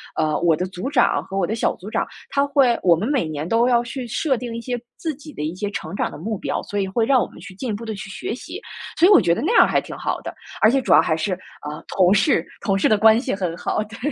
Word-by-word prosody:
呃， 155 -1 0
我 170 -2 +3
的 180 - -2
组 185 +6 -5
长 265 -4 +3
和 195 - -5
我 190 - +2
的 210 - -3
小 225 - 0
组 195 - -10
长， - - -1 0.2
他 280 0 +1
会 275 -4 +3
我 175 -2 +5
们 175 +6 -3
每 270 - +1
年 155 0 -4
都 230 +5 +3
要 240 -1 +3
去 245 +1 -6
设 265 +3 0
定 240 -1 -6
一 230 - -5
些 245 0 -4
自 320 -2 -3
己 295 +2 -12
的 150 - -5
一 155 +2 -2
些 205 +3 -3
成 160 -4 -6
长 - - -1
的 - - -10
目 210 +6 -3
标， - - -3
所 205 - -3
以 195 - 0
会 225 +4 0
让 260 0 +4
我 - - -2
们 - - -17
去 185 - -10
进 245 +6 -5
一 - - -1
步 220 +3 -6
地 220 - -4
去 200 0 -8
学 195 - -4
习。 360 - -8 0.4
所 335 - +5
以 - - +5
我 395 - +9
觉 170 - +2
得 - - -3
那 330 - 0
样 - - +9
儿 - - +2
还 - - +1
挺 - - -9
好 - - -3
的， - - -6 0.3
而 215 - +6
且 270 +1 +2
主 - - +2
要 - - +8
还 160 - 0
是， 185 +4 -1 0.4
呃， 150 - -8
同 185 0 +5
事， 195 -4 +3 0.2
同 195 -1 0
事 - - +3
的 215 - +4
关 220 +2 +6
系 255 -2 -2
很 180 -4 -3
好， 210 - -1
对。 220 +2 -11
215 Hz, 325 characters per minute, -22 LUFS, 185-250 Hz, 0.4 s, 我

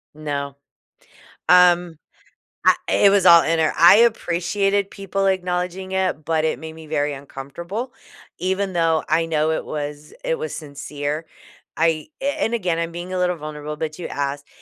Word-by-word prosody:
No. 140 -2 -4 0.9
Um. 175 -2 +5 0.7
Ah - - +6
it 200 - +5
was 200 -1 +3
all 170 -1 +9
inner. 160 -1 +1
I 175 +4 +8
appreciated 200 -2 +1
people 195 0 -2
acknowledging 185 0 -2
it, 185 -5 -1
but 160 -1 0
it 160 - 0
made 160 0 -8
me 160 -1 -12
very 145 -1 -1
uncomfortable, 170 - -7 0.5
even 190 +2 -1
though 165 -2 +2
I 165 +2 +2
know 155 -1 +1
it 160 - -1
was 150 0 -6
it - - 0
was 470 +1 -4
sincere. 145 +1 -5 0.5
I 160 - +1
a - - -1 0.2
and, 225 - -1
again, 180 -7 -1
I'm 170 0 -2
being 175 +2 -7
a - - -1
little 180 -1 +1
vulnerable, 150 0 -6
but 155 +1 -4
you 175 - -5
asked. 140 0 -3
165 Hz, 160 wpm, -21 LUFS, 155-185 Hz, 0.9 s, all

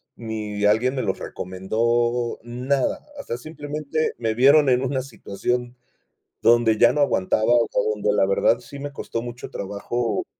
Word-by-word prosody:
ni 105 -2 -4
alguien 115 +6 +3
me 130 - -1
los 95 -3 -2
recomendó, 115 +6 -1
nada, 125 +3 -1
o - - -6
sea, 120 - -4
simplemente 150 +2 -3
me 115 -1 -1
vieron 140 +5 +5
en 125 0 +3
una 130 0 -1
situación 120 0 -4 0.7
donde 115 -2 +4
ya - - +6
no 150 - -1
aguantaba, 110 -6 +1
o 115 -2 +3
sea, - - +1
donde 105 0 0
la 100 - +3
verdad, 100 +4 +3
sí 140 +3 -11
me 145 +1 -5
costó 115 -4 -5
mucho 120 0 -8
trabajo 105 +4 -3
120 Hz, 160 wpm, -23 LUFS, 110-130 Hz, 0.7 s, ya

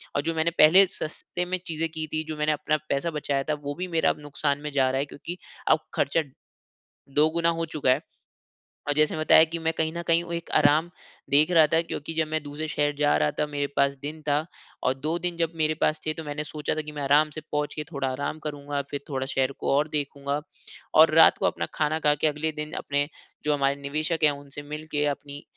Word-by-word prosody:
और 145 - +2
जो 165 +3 -2
मैंने 160 +1 +1
पहले 180 +6 +8
सस्ते 175 +1 -4
में 185 +1 -1
चीज़े 165 0 -1
की 160 -1 -4
थी, 155 +1 -2
जो 155 -1 -6
मैंने 150 0 +1
अपना 150 +1 0
पैसा 150 +5 0
बचाया 145 -2 -1
था - - +3
वो 145 0 -3
भी 185 +3 -4
मेरा 165 -2 +2
अब - - -2
नुकसान 145 -1 -1
में 150 0 -5
जा 135 -2 +2
रहा 135 - 0
है 140 - 0
क्योंकि 165 +5 -8 0.3
अब 155 - +5
खर्चा 150 +4 +1 1.0
दोगुना 160 +3 +3
हो - - +1
चूका 155 -5 0
है। 130 +3 +3 0.9
और 145 - +2
जैसे 155 +1 +2
बताया 155 0 +6
कि 170 - -2
मैं 160 - +3
कहीं 160 0 0
न 170 - -4
कहीं 170 0 +4
वो 170 - -9
एक 170 0 -5
आराम 155 +4 +4 0.4
देख 150 +5 +5
रहा 160 -3 +6
था, 160 +2 +3
क्योंकि 165 -1 -5
जब 160 -1 0
मैं 155 0 -1
दूसरे 145 +2 -5
शहर 145 -1 0
जा 145 0 +3
रहा 75 0 +2
था - - +2
मेरे 145 -1 -2
पास 140 0 +4
दिन 155 +2 -6
था 150 +1 0 0.4
और 130 - +2
2 155 +5 -2
दिन 175 0 -2
जब 165 -1 0
मेरे 155 -1 +1
पास 155 0 +2
थे 155 - 0
तो 160 - -7
मैंने 150 0 -4
सोचा 150 0 -3
था 155 - -1
कि 150 0 -8
मैं 150 -1 -6
आराम 145 +3 +4
से 155 - -5
पहुँच 150 0 -1
के 150 - -3
थोड़ा 140 -3 -2
आराम 140 +4 -3
करूँगा 145 -1 -3
फिर 145 - -3
थोड़ा 135 -2 -2
शहर 135 0 0
को - - -1
और 145 +2 +2
देखूँगा 140 -1 -2 0.6
और 160 0 +7
रात 165 - +7
को - - -1
अपना - - 0
खाना 155 +1 0
खा 150 -2 +3
के 150 - +1
अगले 150 +1 -1
दिन 150 +1 -5
अपने 145 0 0 0.4
जो 150 - +3
हमारे 140 -1 +1
निवेशक 155 +4 -1
हैं 150 - +6
उनसे 145 0 -8
मिलके 150 -1 -2
अपनी 145 +1 -10
150 Hz, 235 wpm, -26 LUFS, 145-160 Hz, 1.0 s, पहले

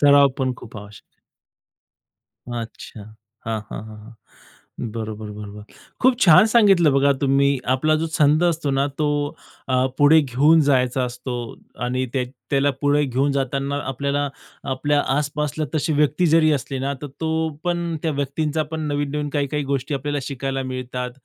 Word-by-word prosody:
सराव 140 -1 +6
पण 130 -1 0
खूप 115 -1 -12
आवश्यक 105 0 -11
आहे. - - -44 1.3
अच्छा. 115 -2 -7 0.5
हां, 110 -1 -2
हां, - - -6
हां, 110 0 -10
हां. 110 +2 -13 0.8
बरोबर, 110 -2 -5
बरोबर. 105 0 -9 0.4
खूप 255 -1 +4
छान 170 +4 +7
सांगितलं 195 - +5
बघा 140 +1 +4
तुम्ही 140 0 +3 0.3
आपला 155 +4 +2
जो 160 +1 -1
छंद 155 0 +3
असतो 165 -4 0
ना, 135 +1 +1
तो 145 -1 -1 0.3
अ, 130 0 +2
पुढे 150 +2 +6
घेऊन 145 +4 +4
जायचा 130 -2 +2
असतो 125 +1 -6 0.5
आणि 130 +1 -1
त्या 130 -2 0 0.3
त्याला 140 0 +3
पुढे 145 0 +2
घेऊन 135 +2 0
जाताना 140 +1 -1
आपल्याला 140 +2 -1 0.4
आपल्या 145 +2 +1 0.2
आसपासला 150 +1 -2
तशी 155 +1 0
व्यक्ती 150 +4 +2
जरी 160 -1 +4
असली 135 -1 -2
ना, 135 +2 -2
तर 145 - -3
तो 160 0 0 0.2
पण 175 -1 -1
त्या 160 - 0
व्यक्तींचा 145 +3 -1
पण 160 - -3
नवीन-नवीन 145 0 -2
काही-काही 145 0 -1
गोष्टी 140 +1 -2
आपल्याला 145 +2 -2
शिकायला 135 0 -3
मिळतात 125 -1 -4
140 Hz, 155 wpm, -22 LUFS, 130-150 Hz, 1.3 s, छान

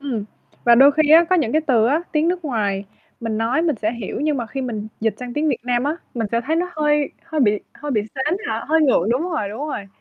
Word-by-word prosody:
Ừm. 250 -7 -3 0.4
Và 235 - +7
đôi 275 +4 +7
khi 305 0 +2
á, 330 +2 +8
có 370 - +5
những 245 -9 0
cái 310 - +3
từ 230 -5 +4
á, 295 +7 +1
tiếng 310 +1 +2
nước 355 -1 -2
ngoài 205 -7 -1 0.4
mình 225 -2 -2
nói 240 +7 +1
mình 315 -6 +1
sẽ 215 +1 -1
hiểu 230 -5 -5
nhưng 300 0 +1
mà 240 -3 -3
khi 270 +4 -5
mình 220 -5 -4
dịch 225 0 0
sang 250 -1 -6
tiếng 305 +1 +1
Việt 270 - +1
Nam 245 0 0
á, 300 +3 -1 0.2
mình 230 -3 -1
sẽ 230 - +2
thấy 320 +2 +1
nó 355 +2 -1
hơi 295 -1 +1
hơi 320 -2 -2
bị 215 -6 +4 0.2
hơi 295 +1 -6
bị 225 -6 +2
sến 295 +6 0
hả? - - -2
Hơi 320 +1 +4
ngượng, 250 - +3
đúng 250 +5 +1
rồi, 305 - -2
đúng 225 +9 -5
rồi. 205 -9 -5
265 Hz, 270 wpm, -21 LUFS, 225-305 Hz, 0.4 s, á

